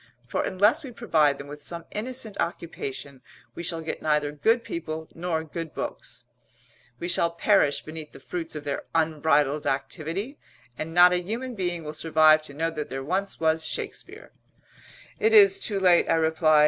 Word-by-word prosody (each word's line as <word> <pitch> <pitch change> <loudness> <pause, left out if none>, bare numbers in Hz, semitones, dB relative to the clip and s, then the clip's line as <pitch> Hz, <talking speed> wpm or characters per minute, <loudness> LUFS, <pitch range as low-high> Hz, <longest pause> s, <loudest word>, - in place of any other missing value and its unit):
For - - -1
unless 210 - +2
we 265 - -7
provide 155 - +2
them 140 - -8
with 145 +1 -10
some 170 +2 -5
innocent 225 -1 -3
occupation 140 -5 -5 0.3
we - - -7
shall 165 -1 -1
get 160 - -5
neither 150 -1 +1
good 225 - +2
people 160 -4 -5
nor 165 -1 -2
good 160 0 -7
books; - - -6 0.7
we 170 - -4
shall 170 -1 +2
perish 170 -5 +2
beneath 155 -1 -8
the - - -13
fruits 165 -3 -5
of 150 - -5
their 145 -1 -3
unbridled 150 -2 +2
activity; 165 - -3 0.4
and 155 +5 -5
not 175 +1 +7
a - - +3
human 235 +7 -4
being 175 -5 -3
will 150 0 -6
survive 155 0 +4
to 155 -2 -10
know 165 +2 -1
that 150 -2 -5
there 135 0 -4
once 190 +7 -2
was 160 0 +2
Shakespeare!" - - -6 0.9
"It 440 0 +3
is 395 -2 +7
too 205 - -2
late," 180 -2 +4
I - - +4
replied. 160 -1 +3
165 Hz, 175 wpm, -26 LUFS, 155-185 Hz, 0.9 s, not